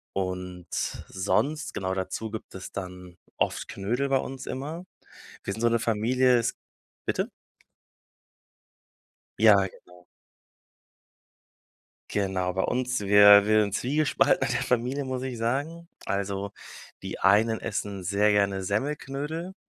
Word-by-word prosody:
Und 90 -2 -4 0.4
sonst, 140 +11 -1
genau 95 -1 -2
dazu 100 +3 -4
gibt 110 -3 -8
es 95 - -8
dann 90 -2 -8 0.2
oft - - -1
Knödel 120 +8 -2
bei 135 - +4
uns 130 0 -5
immer. 155 +7 -5 0.6
Wir 100 - -2
sind 110 - -6
so 120 - +5
'ne 115 0 +2
Familie 120 +3 +2 0.6
bitte? - - -1 2.1
Ja, 110 -1 +8
genau. 90 -2 -4 2.1
Genau, 95 -2 -1
bei 95 - 0
uns 125 -2 -1
wir 100 0 +8
wir 110 0 +4
sind 100 -1 -1
zwiegespalten 145 +6 +2
in - - -1
der - - 0
Familie, 125 +3 0
muss 130 -1 -3
ich 130 -3 -4
sagen. 145 +9 -2 0.2
Also, 100 0 -2 0.5
die - - -5
einen 110 +4 +4
essen 100 -3 -4
sehr 100 +3 +2
gerne 100 -2 +1
Semmelknödel 145 - -3
105 Hz, 120 wpm, -27 LUFS, 95-130 Hz, 2.1 s, Ja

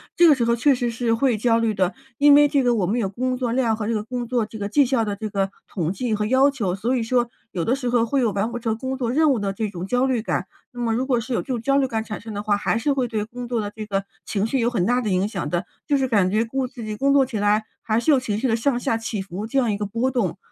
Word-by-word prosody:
这 345 - +6
个 315 - +8
时 240 -4 0
候 235 - +2
确 275 +4 +3
实 245 -1 -1
是 230 0 0
会 240 0 +2
焦 230 +1 +2
虑 225 -2 +1
的。 185 -1 0 0.2
因 290 0 +6
为 290 0 +7
这 280 -1 +1
个 245 -1 +3
我 200 -5 +1
们 215 +7 0
有 200 -5 0
工 255 +5 -2
作 245 -2 -1
量 235 -2 +1
和 215 -1 -4
这 230 - 0
个 215 - 0
工 245 +1 -4
作 235 -2 0
这 220 - -10
个 200 -1 -3
绩 280 +5 +4
效 245 -2 +1
的 205 -2 -3
这 215 +1 -4
个 195 -1 -1 0.2
统 170 -4 -2
计 220 +3 -1
和 210 0 -1
要 260 +5 +4
求， 210 -10 -2
所 230 +7 -1
以 235 - 0
说 240 +1 +1 0.2
有 170 -2 -2
的 245 - +2
时 255 -3 -3
候 240 -1 +2
会 265 +3 0
有 230 - +2
完 200 +3 -1
不 240 - -4
成 225 -2 -2
工 260 +2 -4
作 240 -2 -1
任 310 +3 +3
务 - - -1
的 200 -2 -1
这 215 +2 -2
种 180 -2 -6
焦 250 +5 +1
虑 255 -4 0
感。 - - -2 0.3
那 245 - -9
么 225 - +1
如 255 +3 -1
果 250 -3 +2
是 245 +2 -4
有 - - +1
这 - - -15
种 250 -3 -1
焦 275 +3 +2
虑 270 -2 +2
感 225 -2 -2
产 215 -2 -7
生 220 -1 -8
的 205 - -3
话， 210 -1 +2
还 205 - 0
是 280 +5 +1
会 260 -3 0
对 215 -2 -2
工 245 +2 -8
作 235 -2 -1
的 205 -1 -3
这 220 - -5
个 195 -1 -1 0.2
情 205 0 -1
绪 260 +3 0
有 235 - +2
很 195 -7 0
大 245 +2 +2
的 215 - -2
影 185 +1 +1
响 190 -8 -4
的， 175 +4 -1 0.2
就 285 -2 +3
是 265 - +1
感 205 -7 +2
觉 215 +4 +1
工 265 +2 -2
自 245 -2 -10
己 215 -1 -4
工 275 +4 +2
作 275 -1 +5
起 235 -5 -4
来 205 +1 +2 0.2
还 220 +1 0
是 270 +6 +2
有 275 - +5
情 215 -5 -2
绪 255 +3 0
的 225 - +2
上 240 +2 0
下 230 - 0
起 225 -1 -3
伏， 195 +3 -6
这 275 - -2
样 240 -5 +2
一 200 - -1
个 205 - -2
波 235 +5 -1
动。 205 -8 -1
230 Hz, 350 characters per minute, -23 LUFS, 210-255 Hz, 0.3 s, 个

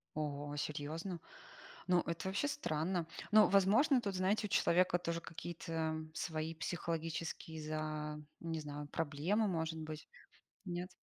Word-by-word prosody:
Ого, 145 -1 -2
серьёзно? 155 +4 -3 0.7
Ну, 180 -1 +5
это 170 +1 -3
вообще 195 +10 +1
странно. 170 - 0 0.2
Но, 215 0 +8
возможно, 220 +8 +5
тут, 200 -3 -2
знаете, 205 +4 +2
у - - -17
человека 180 0 +4
тоже 170 -1 -2
какие-то 160 -1 -3
свои 160 0 -2
психологические 165 -1 -3
за 155 0 -2 0.2
не 165 -1 -2
знаю, 145 -1 -5
проблемы, 165 +9 +1
может 160 -2 -1
быть. 155 -1 -6 0.6
Нет? 180 0 -3
165 Hz, 125 wpm, -37 LUFS, 155-185 Hz, 0.7 s, Но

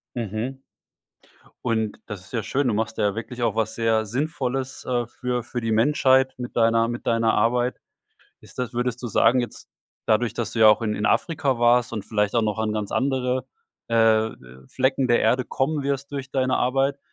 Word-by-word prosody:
Mhm. 115 +4 -4 1.1
Und 110 -3 -1
das 105 -4 -7
ist 95 - -18
ja 115 -3 -2
schön. 135 +5 0
Du 115 - +1
machst 110 +1 -2
ja 105 0 +1
wirklich 120 +2 -6
auch 115 -3 +1
was 110 -1 0
sehr 115 -1 +1
Sinnvolles, 130 +1 -3
äh, 120 -2 -1
für 125 +1 -3
für 120 +1 -5
die 115 -1 -2
Menschheit 130 +2 +3
mit 125 -1 -7
deiner 115 0 +3
mit 120 0 -5
deiner 115 -1 +2
Arbeit. 120 +3 +1 0.6
Ist - - -17
das 125 -1 -3
würdest 125 0 -2
du 120 - -3
sagen, 125 +3 +3
jetzt 120 - -7 0.4
dadurch, 110 +1 +2
dass 115 -2 -3
du - - -4
ja 110 -1 +8
auch 110 +2 +4
in 105 -2 -1
in 105 0 -1
Afrika 150 -7 +1
warst 120 0 +3
und 105 -3 -4
vielleicht 105 -1 0
auch 115 - +3
noch 105 -1 -1
an 110 -1 0
ganz 105 -2 -3
andere, 130 -1 0 0.4
äh, 110 -1 +3
de 65 +1 -16
Flecken 130 0 0
der 120 - +4
Erde 130 0 +2
kommen 145 +2 -1
wirst 140 0 -3
durch 135 -2 -5
deine 130 -1 +1
Arbeit. 135 +2 +1
120 Hz, 195 wpm, -24 LUFS, 110-130 Hz, 1.1 s, ja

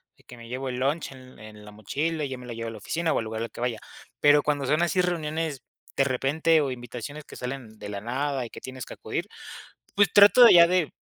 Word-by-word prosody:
de - - -26
que 125 - -13
me 115 0 -12
llevo 130 +2 -4
el 125 - -4
lunch 140 +5 -1
en 130 -1 -14
en 105 -1 -12
la 105 - -11
mochila, 150 +10 -3
y 140 - -3
yo 130 - -5
me 125 - -11
la 120 - -7
llevo 115 0 -5
a - - -7
la 110 - -9
oficina, 160 +10 -2
o - - +1
al 115 - -4
lugar 110 0 -5
al 115 - -4
que - - -10
vaya. 120 -3 -2 0.4
Pero 145 0 +5
cuando 145 -2 -1
son 150 +5 +1
así 175 +2 +2
reuniones 160 -4 -2 0.3
de 135 - +3
repente 145 +5 +2
o 140 - -1
invitaciones 125 +4 -7
que - - -13
salen 125 -4 -7
de 105 - -7
la 100 -1 -5
nada 130 +3 -2
y 115 - -11
que - - -10
tienes 130 -3 -8
que - - -9
acudir, - - -5 0.7
pues 200 -3 +3
trato 205 +5 +8
de 235 - +9
ya 170 -1 +8
de 180 -3 0
135 Hz, 260 wpm, -26 LUFS, 120-155 Hz, 0.7 s, de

